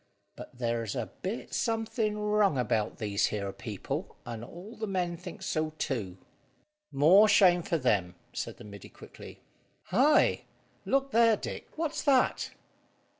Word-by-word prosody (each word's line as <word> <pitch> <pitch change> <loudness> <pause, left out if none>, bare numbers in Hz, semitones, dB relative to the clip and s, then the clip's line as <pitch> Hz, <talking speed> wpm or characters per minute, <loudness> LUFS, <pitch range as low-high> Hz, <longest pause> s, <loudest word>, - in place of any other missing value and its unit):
But - - -11
there's 115 -2 -2
a 120 -4 -4
bit 205 +6 -5
something 225 -2 -1
wrong 210 -6 +2
about 110 -3 0
these 105 -3 0
here 100 -2 -3
people, 105 -5 -5
and 115 -1 -6
all 180 - -10
the 220 - -4
men 180 -3 -1
thinks 180 0 -9
so 155 0 -1
too." 100 -12 -3 0.7
"More 185 +10 +6
shame 180 -4 +6
for 165 - -1
them!" 100 - +1 0.2
said - - -5
the - - -12
middy 100 -1 -11
quickly. - - -13 0.5
"Hi! 260 +11 +4 0.4
Look 275 0 +1
there, 230 -2 +5
Dick; - - -6
what's 320 -1 -2
that?" 270 -4 +2
175 Hz, 140 wpm, -29 LUFS, -, 0.7 s, More